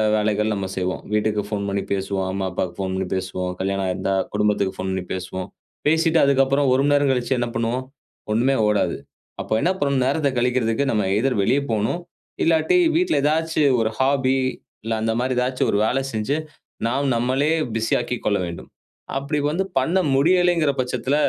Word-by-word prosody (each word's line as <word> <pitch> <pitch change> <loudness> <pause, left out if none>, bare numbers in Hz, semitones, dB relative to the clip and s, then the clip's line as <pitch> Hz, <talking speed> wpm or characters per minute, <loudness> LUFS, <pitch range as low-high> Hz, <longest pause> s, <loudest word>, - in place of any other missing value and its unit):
வேலைகள் 105 0 +1
நம்ம 100 -2 -3
செய்வோம். 90 0 -2
வீட்டுக்கு 105 0 +1
ஃபோன் 105 -1 -3
பண்ணி 100 0 -1
பேசுவோம். 95 -1 -2
அம்மா, 95 0 -2
அப்பாவுக்கு 90 -1 -3
ஃபோன் 95 -1 -2
பண்ணி 95 0 -2
பேசுவோம். 90 -1 -3
கல்யாணம் 95 0 -1
ஆயிருந்தா 95 +1 -1 0.2
குடும்பத்துக்கு 100 -2 +1
ஃபோன் 95 0 -3
பண்ணி 95 -1 -3
பேசுவோம். 95 +1 -5 0.4
பேசிட்டு 160 +1 +3
அதுக்கு 140 -1 +4
அப்புறம் 140 +1 +2
1 135 - +2
மணி 145 0 +3
நேரம் 145 -1 +3
கழிச்சு 125 +1 0
என்ன 120 -1 -1
பண்ணுவோம்? 115 +3 -1 0.5
ஒண்ணுமே 125 +5 +2
ஓடாது. 105 -1 +1 0.4
அப்போ - - -3
என்ன 180 - +3
பண்ணனும் 140 -3 +1
நேரத்த 140 +1 +1
கழிக்குறதுக்கு 125 +1 +1
நம்ம 105 -2 +1
எய்தர் 125 +5 +1
வெளிய 130 +8 +3
போணும், 110 +11 0 0.4
இல்லாட்டி 165 - +3 0.2
வீட்ல 355 +1 +2
ஏதாச்சு 160 +1 +1 0.2
ஒரு 110 -1 +1
ஹாபி, 135 -1 +2 0.5
இல்ல 115 +1 -2
அந்த 110 0 0
மாரி 130 +1 0
ஏதாச்சு 125 +1 0
ஒரு - - +1
வேல 130 +4 +1
செஞ்சு, 110 +6 -1 0.5
நாம் 140 +4 0
நம்மளே 130 +5 +1 0.3
பிஸி 115 0 0
ஆக்கிக் 120 0 -4
கொள்ள 100 -1 +2
வேண்டும். 85 -1 -8 0.5
அப்படி 140 +2 -2
வந்து 175 +5 0 0.2
பண்ண 165 +8 +1 0.2
முடியலங்கிற 170 +1 +3
பட்சத்துல, 130 +2 -1
120 Hz, 170 wpm, -22 LUFS, 100-140 Hz, 0.5 s, அதுக்கு